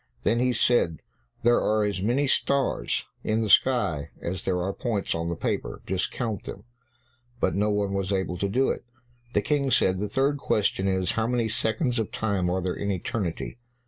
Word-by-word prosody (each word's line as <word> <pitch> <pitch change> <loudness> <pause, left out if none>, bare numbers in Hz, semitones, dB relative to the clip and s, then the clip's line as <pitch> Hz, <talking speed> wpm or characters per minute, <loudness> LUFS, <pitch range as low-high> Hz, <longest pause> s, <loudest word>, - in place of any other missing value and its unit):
Then 115 +3 +2
he 125 +1 +3
said, 115 - +2 0.4
"There 120 +1 +4
are 110 0 +2
as 100 -3 -1
many 120 +8 +2
stars 140 0 +1 0.2
in 110 +1 +1
the 110 -2 +1
sky 100 - +3
as 90 +1 -4
there 90 -1 +1
are 95 +2 -1
points 110 -4 -1
on 85 0 -2
the 85 - -2
paper; - - -3
just 95 0 -1
count 110 -6 -3
them." - - -7 0.8
But - - +1
no 105 +2 +1
one 105 -1 0
was 95 0 -1
able 95 -2 -1
to 100 - 0
do 130 +6 +2
it. - - -5 0.5
The 105 - +2
King 140 +3 +1
said, 95 -7 +3
"The 105 +1 -2
third 140 +2 +1
question 100 -5 +1
is, 95 -2 +1
how 110 0 0
many 120 -2 +1
seconds 115 +3 0
of 110 - -2
time 100 -5 0
are 90 0 0
there 90 -1 -1
in 100 - -3
eternity." 95 +2 -3
105 Hz, 195 wpm, -26 LUFS, 95-120 Hz, 0.8 s, There